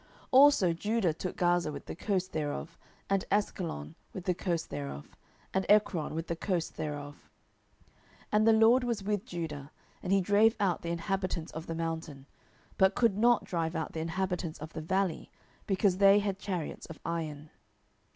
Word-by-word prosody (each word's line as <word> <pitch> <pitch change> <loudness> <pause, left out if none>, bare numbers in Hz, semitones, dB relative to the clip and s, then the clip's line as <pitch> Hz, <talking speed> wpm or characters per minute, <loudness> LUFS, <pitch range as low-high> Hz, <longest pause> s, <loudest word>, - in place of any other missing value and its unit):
07:001:018 - - -29 0.2
Also 265 -10 +6
Judah 205 0 0
took 180 +3 -5
Gaza 175 -3 +2
with - - -8
the - - -6
coast 185 +1 -1
thereof, 145 - -3 0.3
and 195 -1 +1
Askelon 175 - -1 0.2
with 185 - -6
the 180 - +2
coast 170 -2 -2
thereof, 70 -1 -6 0.4
and 190 - +1
Ekron 200 -7 +3
with 165 0 -3
the 170 - -3
coast 175 -1 -2
thereof. 145 -1 -4
07:001:019 - - -24 1.1
And 215 +1 +3
the 225 - +7
LORD 225 +3 +5
was 235 -5 -2
with 205 +1 -1
Judah; 155 - -5 0.3
and 180 - -3
he 195 - +5
drave 205 +4 +4
out 190 -4 +1
the 170 - -4
inhabitants 175 -1 -2
of 160 +1 -7
the 165 - -3
mountain; 160 -4 -4 0.5
but 190 0 +5
could 230 -5 +3
not 235 +2 +4
drive 165 -1 -2
out 160 - -3
the 160 - -4
inhabitants 170 0 -2
of 155 +2 -9
the 160 - -5
valley, 190 +1 -1 0.4
because 190 -1 +2
they 200 0 +7
had 200 -2 -1
chariots 180 -6 -4
of 160 - -10
iron. 155 -3 -4
180 Hz, 175 wpm, -30 LUFS, 160-200 Hz, 1.1 s, the